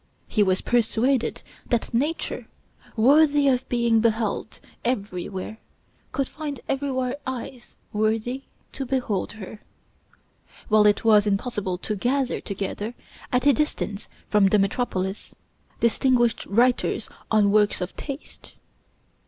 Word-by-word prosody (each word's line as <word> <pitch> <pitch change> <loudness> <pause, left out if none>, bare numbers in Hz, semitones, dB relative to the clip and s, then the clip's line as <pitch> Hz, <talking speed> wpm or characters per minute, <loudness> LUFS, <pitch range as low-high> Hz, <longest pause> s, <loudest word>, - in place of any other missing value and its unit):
He 215 - +1
was 190 -2 +3
persuaded 240 +2 +1 0.3
that 240 0 0
nature, 295 +8 -1 0.5
worthy 285 +4 +5
of 260 -1 +1
being 235 -2 +3
beheld 220 -1 0 0.2
everywhere, 200 -2 -3 0.5
could 275 -2 -1
find 295 -4 -6
everywhere 265 -2 -1
eyes 255 -1 -6 0.2
worthy 220 +4 0 0.3
to 275 - -4
behold 250 -6 -1
her; 210 0 -9 1.1
while 215 -1 +6
it 205 +2 +2
was 210 -2 +6
impossible 200 -2 -1
to 210 +4 -3
gather 255 +5 0
together, 205 +3 -4 0.4
at 250 +1 +1
a 285 - +7
distance 230 -7 -2 0.2
from 210 -2 +4
the 210 - +4
metropolis, 195 -1 -1 0.5
distinguished 240 0 +2
writers 245 +5 +2 0.2
on 210 -2 +4
works 210 0 +3
of 180 0 -4
taste. 280 0 -8
230 Hz, 115 wpm, -24 LUFS, 210-260 Hz, 1.1 s, a